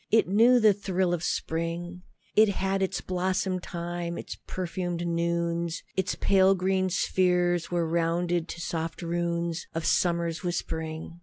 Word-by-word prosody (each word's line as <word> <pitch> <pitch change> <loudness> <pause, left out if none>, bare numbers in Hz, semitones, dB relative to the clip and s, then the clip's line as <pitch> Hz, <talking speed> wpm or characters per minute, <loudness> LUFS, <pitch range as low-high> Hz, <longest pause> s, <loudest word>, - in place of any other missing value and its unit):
It 225 - +4
knew 230 +6 +5
the 215 -2 +6
thrill 185 -2 0
of 175 -1 -2
spring; 175 +1 -2 0.3
It 215 0 +6
had 195 0 -1
its 190 0 -1
blossom 185 0 -1
time, 175 0 -4
its - - -6
perfumed 175 -1 -3
noons; 170 0 -1
Its 190 -1 0
pale 195 0 +4
green 185 0 +1
spheres 180 -1 +1
were 175 -2 0
rounded 170 +1 0
to 170 - -7
soft 165 0 -3
runes 170 0 -2
Of 165 -1 -2
summer's 170 -2 +1
whispering. 165 -1 -4
175 Hz, 140 wpm, -27 LUFS, 170-185 Hz, 0.3 s, the